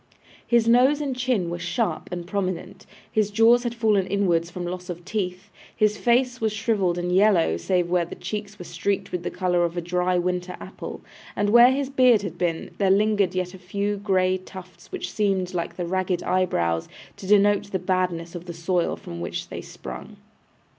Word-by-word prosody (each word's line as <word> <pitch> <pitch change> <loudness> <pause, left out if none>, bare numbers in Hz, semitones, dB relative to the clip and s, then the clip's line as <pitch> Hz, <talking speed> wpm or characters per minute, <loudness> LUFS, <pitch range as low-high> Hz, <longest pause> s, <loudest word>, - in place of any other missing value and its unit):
His 235 -1 +3
nose 255 +5 +5
and 280 -3 -2
chin 250 -9 0
were 175 - -4
sharp 175 +7 -2
and 175 -1 -4
prominent, 185 -1 -4 0.2
his 215 -2 +1
jaws 225 +3 +5
had 240 -1 -3
fallen 215 -5 +2
inwards 175 -4 +1
from 175 0 -6
loss 180 +1 -6
of 175 0 -6
teeth, 195 -1 -4 0.2
his 215 -1 +2
face 245 +1 +1
was 220 -1 +1
shrivelled 205 -4 0
and 175 0 -2
yellow, 190 - +4
save 175 - 0
where 175 0 +2
the 170 - -8
cheeks 210 -1 -6
were 180 - -9
streaked 190 +4 -2
with 180 - -2
the - - -3
colour 180 -1 +1
of 170 0 -2
a - - +2
dry 180 +1 0
winter 180 +1 -2
apple; - - -8 0.3
and 205 0 +1
where 240 +2 +8
his 275 0 -1
beard 250 -6 +5
had 175 -3 -6
been, 170 -2 -2
there 195 -2 +3
lingered 200 -1 +2
yet 180 0 -2
a 190 - -11
few 200 +3 -2
grey 185 -2 +1
tufts 185 -1 -12
which - - -5
seemed, 195 -3 0
like 170 -1 -3
the 175 - -3
ragged 185 0 -1
eyebrows, 85 - 0 0.3
to 190 - -9
denote 205 0 +4
the 190 - 0
badness 180 -2 -1
of 175 -1 -7
the 175 - -6
soil 170 +1 0
from 85 0 -8
which 85 - -5
they - - -6
sprung. - - -9
185 Hz, 195 wpm, -24 LUFS, 175-210 Hz, 0.3 s, where